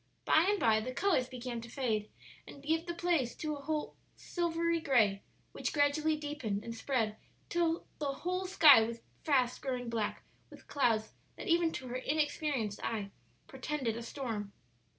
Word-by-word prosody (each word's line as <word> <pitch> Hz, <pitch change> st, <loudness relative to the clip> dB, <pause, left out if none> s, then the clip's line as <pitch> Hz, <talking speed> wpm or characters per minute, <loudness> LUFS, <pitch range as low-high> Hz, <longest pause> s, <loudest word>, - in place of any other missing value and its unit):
By 320 Hz, +4 st, +5 dB
and 410 Hz, -1 st, +2 dB
by 220 Hz, -1 st, +4 dB
the 245 Hz, +4 st, -4 dB
colors 335 Hz, -11 st, +2 dB
began 245 Hz, -2 st, -5 dB
to 230 Hz, -, -10 dB
fade 225 Hz, -5 st, -1 dB, 0.4 s
and 280 Hz, -, -11 dB
give 325 Hz, +3 st, 0 dB
place 340 Hz, -7 st, 0 dB
to 305 Hz, -1 st, -3 dB
a 300 Hz, +2 st, -2 dB, 0.3 s
silvery 335 Hz, -1 st, 0 dB
gray, 220 Hz, -10 st, +3 dB, 0.3 s
which -, -, -3 dB
gradually 300 Hz, +2 st, +2 dB
deepened 290 Hz, -9 st, -3 dB
and 230 Hz, -, -5 dB
spread 225 Hz, -3 st, -1 dB, 0.3 s
till 335 Hz, -1 st, +1 dB
the 290 Hz, -2 st, 0 dB
whole 365 Hz, +1 st, -1 dB
sky 305 Hz, -10 st, +8 dB
was 230 Hz, +1 st, -3 dB, 0.2 s
fast 255 Hz, -5 st, +2 dB
growing 250 Hz, -3 st, -3 dB
black 220 Hz, -3 st, -2 dB, 0.3 s
with -, -, -14 dB
clouds 225 Hz, -6 st, +1 dB, 0.2 s
that -, -, -8 dB
even 335 Hz, -2 st, +3 dB
to 260 Hz, -, -5 dB
her 250 Hz, -, -2 dB
inexperienced 290 Hz, -6 st, -1 dB
eye 205 Hz, -3 st, -2 dB, 0.4 s
portended 265 Hz, -3 st, -2 dB
a 235 Hz, -, -5 dB
storm. 230 Hz, -5 st, -4 dB
270 Hz, 155 wpm, -33 LUFS, 230-315 Hz, 0.4 s, sky